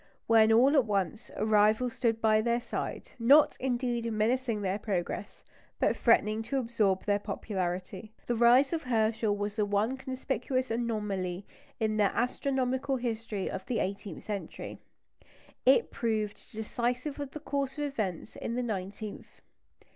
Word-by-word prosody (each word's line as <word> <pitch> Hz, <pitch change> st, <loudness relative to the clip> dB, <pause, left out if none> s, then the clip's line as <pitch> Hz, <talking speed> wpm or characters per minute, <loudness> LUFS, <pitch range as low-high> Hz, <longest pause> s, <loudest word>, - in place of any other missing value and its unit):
When 225 Hz, -1 st, +5 dB
all 255 Hz, +6 st, +5 dB
at 270 Hz, -5 st, +5 dB
once, 200 Hz, 0 st, -1 dB
a 215 Hz, -, -1 dB
rival 215 Hz, +3 st, +3 dB
stood 235 Hz, -3 st, 0 dB
by 215 Hz, -1 st, +4 dB
their 235 Hz, +1 st, +1 dB
side 240 Hz, -, -5 dB
not, 280 Hz, +6 st, +6 dB
indeed, 240 Hz, -2 st, -1 dB
menacing 225 Hz, 0 st, 0 dB
their 195 Hz, +1 st, -1 dB
progress, 195 Hz, -1 st, -4 dB, 0.3 s
but -, -, +2 dB
threatening 220 Hz, -2 st, +3 dB
to 235 Hz, +5 st, -2 dB
absorb 225 Hz, -6 st, +1 dB
their 205 Hz, -1 st, +2 dB
popularity. 190 Hz, 0 st, -4 dB
The 240 Hz, -, 0 dB
rise 245 Hz, +6 st, +5 dB
of 325 Hz, -, 0 dB
Herschel 220 Hz, -4 st, +1 dB
was 205 Hz, 0 st, -3 dB
the 215 Hz, -, +1 dB
one 210 Hz, +6 st, +1 dB
conspicuous 260 Hz, -1 st, -2 dB
anomaly 205 Hz, -5 st, -2 dB, 0.3 s
in 215 Hz, -1 st, 0 dB
the 210 Hz, -, +4 dB
astronomical 260 Hz, +2 st, 0 dB
history 225 Hz, -5 st, -3 dB
of 190 Hz, -, -4 dB
the 245 Hz, -, -1 dB
eighteenth 195 Hz, -2 st, -4 dB
century. 205 Hz, -2 st, -6 dB, 0.9 s
It 470 Hz, -, +5 dB
proved 215 Hz, -4 st, -2 dB
decisive 245 Hz, +6 st, -2 dB
of 285 Hz, -2 st, -4 dB
the 305 Hz, -, -8 dB
course 280 Hz, -2 st, -2 dB
of 295 Hz, -, -2 dB
events 215 Hz, -, -3 dB
in 235 Hz, -, -4 dB
the 250 Hz, -, -1 dB
nineteenth. 205 Hz, -1 st, -6 dB
225 Hz, 145 wpm, -30 LUFS, 210-250 Hz, 0.9 s, not